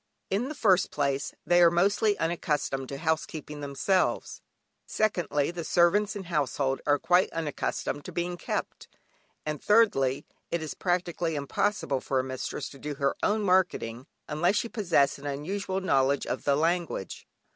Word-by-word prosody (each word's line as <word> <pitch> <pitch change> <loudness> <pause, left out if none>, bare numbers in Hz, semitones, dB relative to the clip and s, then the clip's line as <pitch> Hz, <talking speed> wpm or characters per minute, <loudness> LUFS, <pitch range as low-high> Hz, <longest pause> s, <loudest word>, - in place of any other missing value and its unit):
In 220 +8 0
the 305 - -5
first 195 -8 +3
place, 140 -1 -1
they 175 0 +4
are 170 - +8
mostly 200 +5 +2
unaccustomed 150 -5 -1
to 140 - -5
housekeeping 155 -1 -3
themselves; 145 +7 0 0.5
secondly, 175 -9 0
the 175 -1 -5
servants 175 +6 +3
and 195 -2 -6
household 140 -4 -1
are 145 0 +4
quite 180 +5 +3
unaccustomed 150 -2 -3
to - - -6
being 175 +1 -2
"kept"; - - -4 0.6
and 155 -2 -3
thirdly, 170 - +3 0.2
it 170 -2 -2
is 155 - -4
practically 175 -2 -1
impossible 140 0 -1
for 135 - 0
a - - 0
mistress 130 +2 -4
to 140 - -13
do 150 +1 -5
her 140 0 0
own 210 0 +1
marketing 180 - +1 0.2
unless 175 +6 +1
she 235 - 0
possess 170 -12 +2
an 145 - -7
unusual 185 +7 -3
knowledge 140 -6 +2
of - - -4
the 140 - +3
language. 165 - -1
165 Hz, 155 wpm, -28 LUFS, 140-185 Hz, 0.6 s, are